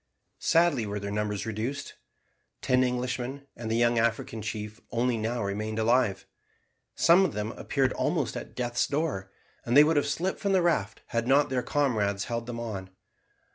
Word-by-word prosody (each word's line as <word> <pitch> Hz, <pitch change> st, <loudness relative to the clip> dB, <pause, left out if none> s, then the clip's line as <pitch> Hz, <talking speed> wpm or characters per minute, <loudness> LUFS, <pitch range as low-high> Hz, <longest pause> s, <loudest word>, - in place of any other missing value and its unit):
Sadly 165 Hz, -9 st, +3 dB
were 105 Hz, 0 st, -3 dB
their 100 Hz, 0 st, -5 dB
numbers 105 Hz, 0 st, -2 dB
reduced. 115 Hz, +6 st, -4 dB, 0.7 s
Ten 130 Hz, 0 st, +3 dB
Englishmen 125 Hz, +2 st, -2 dB
and 115 Hz, -1 st, -6 dB
the 110 Hz, -, +1 dB
young 120 Hz, 0 st, +3 dB
African 115 Hz, -1 st, -1 dB
chief 105 Hz, +1 st, -5 dB
only 120 Hz, 0 st, +1 dB
now 115 Hz, +1 st, -2 dB
remained 105 Hz, +2 st, -3 dB
alive. 110 Hz, -2 st, +2 dB, 0.7 s
Some 175 Hz, +3 st, +6 dB
of 185 Hz, -, 0 dB
them 105 Hz, +1 st, -3 dB
appeared 130 Hz, +1 st, 0 dB
almost 150 Hz, -4 st, -1 dB
at -, -, -7 dB
death's 120 Hz, -1 st, 0 dB
door, 140 Hz, -11 st, -2 dB, 0.3 s
and 120 Hz, +3 st, +2 dB
they 145 Hz, -, +10 dB
would 155 Hz, 0 st, +2 dB
have 145 Hz, -, +2 dB
slipped 170 Hz, +7 st, -1 dB
from 200 Hz, -2 st, 0 dB
the 185 Hz, -2 st, +4 dB
raft 115 Hz, -, 0 dB
had 115 Hz, 0 st, -1 dB
not 140 Hz, +2 st, +4 dB
their 130 Hz, -1 st, +1 dB
comrades 110 Hz, -10 st, 0 dB
held 115 Hz, 0 st, -4 dB
them 120 Hz, -1 st, -5 dB
on. 100 Hz, -5 st, -5 dB
120 Hz, 175 wpm, -28 LUFS, 110-140 Hz, 0.7 s, they